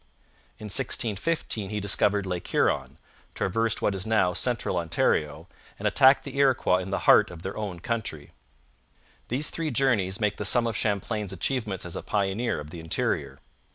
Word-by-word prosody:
In 110 Hz, -, -9 dB
1615 110 Hz, 0 st, -1 dB
he 105 Hz, 0 st, -3 dB
discovered 100 Hz, 0 st, +1 dB
Lake 90 Hz, -2 st, -4 dB
Huron, -, -, 0 dB, 0.4 s
traversed 115 Hz, +2 st, 0 dB
what 100 Hz, -, +2 dB
is 95 Hz, -1 st, -2 dB
now 105 Hz, -5 st, +2 dB
Central 115 Hz, -2 st, -1 dB
Ontario, 80 Hz, -1 st, 0 dB, 0.3 s
and -, -, -1 dB
attacked 135 Hz, 0 st, +5 dB
the -, -, -8 dB
Iroquois 130 Hz, -9 st, +3 dB
in 95 Hz, +1 st, -6 dB
the 100 Hz, -, -2 dB
heart -, -, +6 dB
of 85 Hz, -1 st, -11 dB
their 95 Hz, -, -5 dB
own 100 Hz, -5 st, -5 dB
country. 100 Hz, -8 st, -4 dB, 1.0 s
These 135 Hz, +6 st, +1 dB
three 165 Hz, -1 st, -3 dB
journeys 115 Hz, -8 st, +1 dB
make 105 Hz, -2 st, 0 dB
the -, -, -3 dB
sum 120 Hz, +3 st, +3 dB
of 115 Hz, -2 st, -2 dB
Champlain's 105 Hz, -1 st, -2 dB
achievements 100 Hz, -1 st, -2 dB
as 85 Hz, -, -7 dB
a -, -, -4 dB
pioneer 100 Hz, +1 st, -1 dB
of 75 Hz, +1 st, -9 dB
the 85 Hz, -, -8 dB
interior. 70 Hz, -4 st, -2 dB
100 Hz, 165 wpm, -26 LUFS, 90-115 Hz, 1.0 s, heart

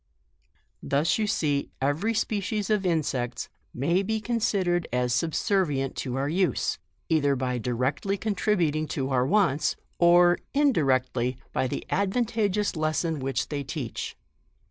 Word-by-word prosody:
Thus 150 Hz, -, +1 dB
you 215 Hz, -, +1 dB
see 145 Hz, -7 st, 0 dB
every 155 Hz, +12 st, 0 dB
species 210 Hz, 0 st, -1 dB
of 200 Hz, -3 st, +2 dB
insects 135 Hz, -7 st, -1 dB, 0.2 s
may 170 Hz, +9 st, +1 dB
be 220 Hz, +3 st, -1 dB
considered 200 Hz, -7 st, 0 dB
as 125 Hz, 0 st, +1 dB
subservient 150 Hz, -1 st, 0 dB
to 125 Hz, -2 st, -3 dB
our 135 Hz, +1 st, 0 dB
use, 180 Hz, +4 st, 0 dB, 0.3 s
either 145 Hz, -4 st, +2 dB
by 125 Hz, -1 st, -1 dB
directly 130 Hz, -, -1 dB
contributing 185 Hz, -7 st, 0 dB
to 135 Hz, -1 st, -1 dB
our 125 Hz, -1 st, +2 dB
wants, 180 Hz, -7 st, +2 dB, 0.2 s
or 175 Hz, 0 st, +6 dB, 0.2 s
in 285 Hz, -1 st, +4 dB
directly, 130 Hz, -, +1 dB, 0.2 s
by 130 Hz, -, +1 dB
the -, -, -4 dB
advantageous 210 Hz, 0 st, 0 dB
lesson 155 Hz, 0 st, 0 dB
which 130 Hz, -2 st, -2 dB
they 145 Hz, -2 st, -3 dB
teach. 130 Hz, -3 st, -5 dB
160 Hz, 130 wpm, -26 LUFS, 135-200 Hz, 0.3 s, or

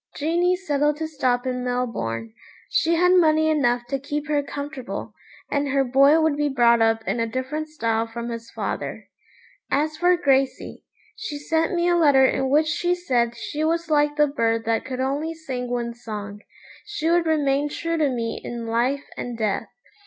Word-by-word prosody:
Jeanie 345 Hz, +4 st, +1 dB
settled 295 Hz, -5 st, 0 dB
to 320 Hz, 0 st, -3 dB
stop 255 Hz, -5 st, 0 dB
in 250 Hz, -1 st, -2 dB
Melbourne. 115 Hz, -, -3 dB, 0.4 s
She 335 Hz, +1 st, +2 dB
had 360 Hz, +2 st, +4 dB
money 315 Hz, -3 st, +4 dB
enough 245 Hz, -5 st, +1 dB
to 275 Hz, -, -1 dB
keep 295 Hz, +2 st, -4 dB
her 295 Hz, -1 st, +2 dB
comfortable, 285 Hz, -2 st, -6 dB, 0.4 s
and 285 Hz, 0 st, 0 dB
her 275 Hz, 0 st, +2 dB
boy 275 Hz, +4 st, +5 dB
would 315 Hz, -2 st, +2 dB
be 295 Hz, 0 st, 0 dB
brought 235 Hz, -3 st, +4 dB
up 225 Hz, 0 st, +2 dB
in -, -, 0 dB
a 230 Hz, -, 0 dB
different 260 Hz, +6 st, -3 dB
style 230 Hz, -7 st, -1 dB
from 235 Hz, +1 st, -6 dB
his 230 Hz, -1 st, -6 dB
father. -, -, -5 dB, 0.6 s
As 305 Hz, +2 st, 0 dB
for 355 Hz, +2 st, +3 dB
Gracey, 275 Hz, -5 st, 0 dB, 0.3 s
she 440 Hz, -10 st, -5 dB
sent 320 Hz, +4 st, 0 dB
me 345 Hz, 0 st, +1 dB
a 350 Hz, -, +3 dB
letter 285 Hz, -6 st, +5 dB
in 265 Hz, 0 st, +1 dB
which 300 Hz, +3 st, +4 dB
she 350 Hz, +3 st, 0 dB
said 240 Hz, -9 st, 0 dB
she 300 Hz, +6 st, -4 dB
was 330 Hz, +1 st, 0 dB
like 295 Hz, -1 st, +3 dB
the 300 Hz, 0 st, +4 dB
bird 230 Hz, -5 st, 0 dB
that 225 Hz, 0 st, 0 dB
could 260 Hz, 0 st, -4 dB
only 290 Hz, +5 st, -2 dB
sing 260 Hz, -6 st, -5 dB
one 240 Hz, -1 st, -2 dB
song. 210 Hz, -3 st, -7 dB, 0.4 s
She 410 Hz, -7 st, -4 dB
would 340 Hz, 0 st, +3 dB
remain 290 Hz, -2 st, +1 dB
true 335 Hz, +2 st, -2 dB
to 300 Hz, -3 st, +2 dB
me 230 Hz, -3 st, -3 dB
in 235 Hz, -1 st, -5 dB
life 245 Hz, +5 st, 0 dB
and 245 Hz, -1 st, -5 dB
death. 215 Hz, -3 st, -1 dB
280 Hz, 180 wpm, -23 LUFS, 240-315 Hz, 0.6 s, boy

